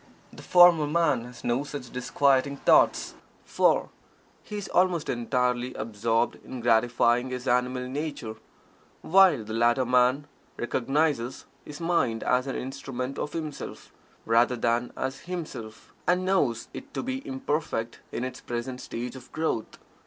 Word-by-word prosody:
The - - -11
former 175 -4 +6
man 150 -6 +1
has 125 -1 -12
no 120 +4 0
such 140 -4 -7
disquieting 140 +2 +1
thoughts, - - +3 0.3
for - - +2 0.5
he 210 - -7
is 205 - -5
almost 180 -3 +2
entirely 125 +1 0
absorbed 115 +2 -1
in 130 - -7
gratifying 120 +1 +2
his 125 0 -5
animal 125 +1 +1
nature, 140 -5 -4 0.7
while 180 - +5
the 110 +1 -7
latter 120 +3 +3
man 125 +3 +3 0.3
recognizes 130 +1 -1 0.2
his 145 0 -9
mind 165 -10 0
as 125 +1 +1
an 135 - -3
instrument 135 0 -5
of 150 - -4
himself, 155 -3 -6 0.3
rather 120 +2 +3
than 120 +1 0
as 130 +1 -3
himself, 150 -11 -7
and 180 +1 +2
knows 145 -12 +1
it 275 +1 -10
to - - -2
be 260 +1 -3
imperfect 150 - -2
in 120 - -3
its 130 - -5
present 120 +2 -5
stage 120 +2 -5
of 130 -1 -12
growth. 155 -8 -2
130 Hz, 140 wpm, -27 LUFS, 120-150 Hz, 0.7 s, former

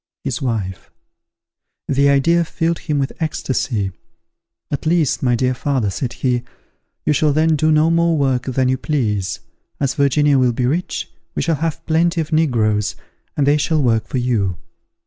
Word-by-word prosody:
His 135 -2 -3
wife! 110 -8 -3 1.0
The 140 +1 +3
idea 165 +5 +3
filled 165 +1 -1
him 150 -2 -2
with 135 -1 -1
ecstasy. 130 - -1 0.8
"At 145 +2 -2
least, 165 -3 +2
my 125 -2 +2
dear 130 +2 +1
father," 125 -6 -1
said 120 +4 -3
he, 125 -2 0 0.6
"you - - +3
shall 150 +1 +2
then 160 +1 +3
do 155 +1 +2
no 155 +2 +4
more 170 -1 +2
work 130 -3 +1
than 130 0 0
you 130 0 +1
please. 105 -10 -1 0.4
As 140 -2 0
Virginia 140 0 +3
will 125 -2 +3
be 125 +1 -1
rich, 165 +8 -1 0.3
we - - 0
shall 165 -3 +1
have 160 +1 -3
plenty 170 +2 +2
of 160 -1 -2
negroes, 110 -9 +1 0.4
and 145 - +2
they 145 +1 +4
shall 155 +1 +1
work 115 -3 +1
for - - -3
you. 110 -8 0
140 Hz, 165 wpm, -19 LUFS, 125-155 Hz, 1.0 s, no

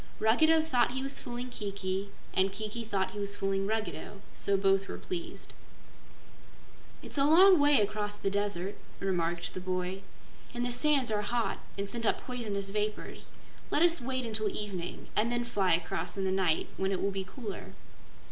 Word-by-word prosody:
Ruggedo 315 +9 +5
thought 250 -6 +2
he 265 0 -2
was 275 +1 -2
fooling 245 +1 -5
Kiki, 200 -2 -3 0.2
and 190 +1 +3
Kiki 215 +3 -4
thought 195 -4 -1
he 205 - -6
was 200 0 -1
fooling 195 0 0
Ruggedo; 205 -2 -3
so 200 0 +1
both 195 0 +3
were - - -5
pleased. 345 -1 -6 1.5
"It's - - -2
a - - +5
long 355 +5 +8
way 290 -2 +6
across 205 0 -1
the 195 -1 -1
Desert," 200 -1 -1 0.2
remarked 175 -3 -1
the - - -4
boy, 185 +1 -2 0.5
"and 240 0 -1
the 245 - -1
sands 275 -2 +3
are 210 -1 +1
hot 235 +3 -1 0.2
and 200 0 -2
send 230 +1 -1
up - - +2
poisonous 210 -6 -3
vapors. 210 +1 -3 0.4
Let 305 - +3
us 340 -4 +5
wait 260 0 -1
until 215 -2 0
evening 195 -4 -5
and 230 +3 +2
then 240 0 0
fly 195 -7 +3
across 175 +4 -3
in 195 - -1
the 190 - +1
night 185 -4 +2
when 190 0 0
it 190 - 0
will 200 - 0
be 195 0 -2
cooler." 205 +1 -7
205 Hz, 175 wpm, -31 LUFS, 195-245 Hz, 1.5 s, long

